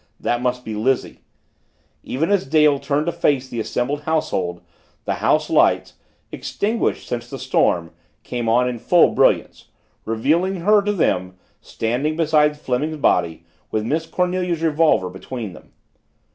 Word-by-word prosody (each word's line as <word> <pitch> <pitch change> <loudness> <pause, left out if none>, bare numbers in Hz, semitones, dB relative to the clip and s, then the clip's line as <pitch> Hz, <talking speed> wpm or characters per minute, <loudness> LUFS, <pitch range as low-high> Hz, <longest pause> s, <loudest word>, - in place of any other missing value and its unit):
that 120 0 -1
must 125 0 -2
be 110 - -5
Lizzie 125 +5 -1 0.8
Even 160 +9 -2
as 200 -9 +1
Dale 150 -1 +4
turned 145 +2 -1
to 170 - 0
face 145 -6 0
the 120 -2 -5
assembled 125 +6 -2
household, 95 - -1 0.4
the - - 0
house - - +2
lights, - - +2 0.4
extinguished 220 +3 -2
since 120 0 -4
the 135 - -6
storm, 90 -10 +1 0.3
came 120 -2 -3
on 125 +2 +3
in 125 -2 -3
full 175 +8 +4
brilliance - - +1 0.4
revealing 165 - 0
her 210 +3 +4
to 205 +1 -1
them, 90 - 0 0.2
standing 125 +7 -2
beside 150 -2 +2
Fleming's 150 +4 -2
body 85 - +1 0.2
with 110 0 -2
Miss 160 +6 -1
Cornelia's 180 -2 -1
revolver 155 - +3
between 100 +3 -7
them. - - -16
140 Hz, 145 wpm, -21 LUFS, 115-160 Hz, 0.8 s, Dale